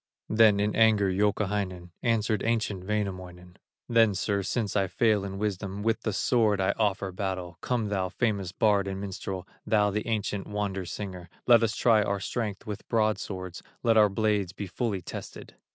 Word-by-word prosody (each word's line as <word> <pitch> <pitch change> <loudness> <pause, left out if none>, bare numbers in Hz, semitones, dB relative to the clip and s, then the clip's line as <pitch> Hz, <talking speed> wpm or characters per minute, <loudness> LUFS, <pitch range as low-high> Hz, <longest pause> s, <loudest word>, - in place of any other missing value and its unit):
Then 110 -2 +5
in 105 0 0
anger 110 -4 +4
Youkahainen 100 -3 -1
Answered 110 -3 +1
ancient 110 -5 -1
Wainamoinen: 95 -4 -4 0.3
"Then, 115 -4 +4
sir, 100 +2 0
since 105 +1 -2
I 100 -2 +2
fail 105 +2 +2
in 95 -1 -5
wisdom, 100 -1 -3
With 115 0 +1
the 110 - -1
sword 105 -1 +2
I 95 - +2
offer 100 -3 -1
battle; 90 -2 -4
Come 120 -4 -1
thou, 95 -2 -1
famous 100 -2 -1
bard 100 0 +2
and 95 0 -4
minstrel, 95 -1 -5 0.2
Thou 105 -2 +2
the 105 +3 -3
ancient 105 -3 -2
wonder 100 -3 -3
singer, 90 -3 -6 0.2
Let 120 -2 +7
us 110 -1 +1
try 115 -3 +4
our 100 -1 -1
strength 105 -1 -3
with 105 -1 -7
broadswords, 100 -5 -1 0.2
Let 115 -1 +4
our 105 -1 +6
blades 100 -2 0
be 100 - -5
fully 100 -1 -3
tested." - - -8
100 Hz, 170 wpm, -28 LUFS, 95-110 Hz, 0.3 s, Let